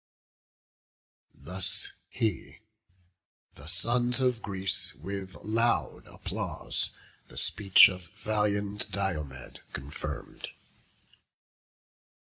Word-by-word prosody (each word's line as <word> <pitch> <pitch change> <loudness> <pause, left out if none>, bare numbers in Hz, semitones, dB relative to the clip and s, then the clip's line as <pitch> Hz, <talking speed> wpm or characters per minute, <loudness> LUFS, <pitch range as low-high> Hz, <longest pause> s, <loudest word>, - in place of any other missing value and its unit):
Thus 95 +2 -2 0.2
he; 110 -7 -1 1.0
the - - -11
sons 120 +1 +1
of 125 -3 +3
Greece, 95 -1 -2
with 95 -1 -5
loud 115 +2 +2
applause, - - -3 0.4
The - - -13
speech 95 -3 +7
of 90 -2 -5
valiant 105 +1 0
Diomed 75 -10 -2
confirm'd. 70 +2 -4
100 Hz, 75 wpm, -30 LUFS, 95-110 Hz, 1.0 s, speech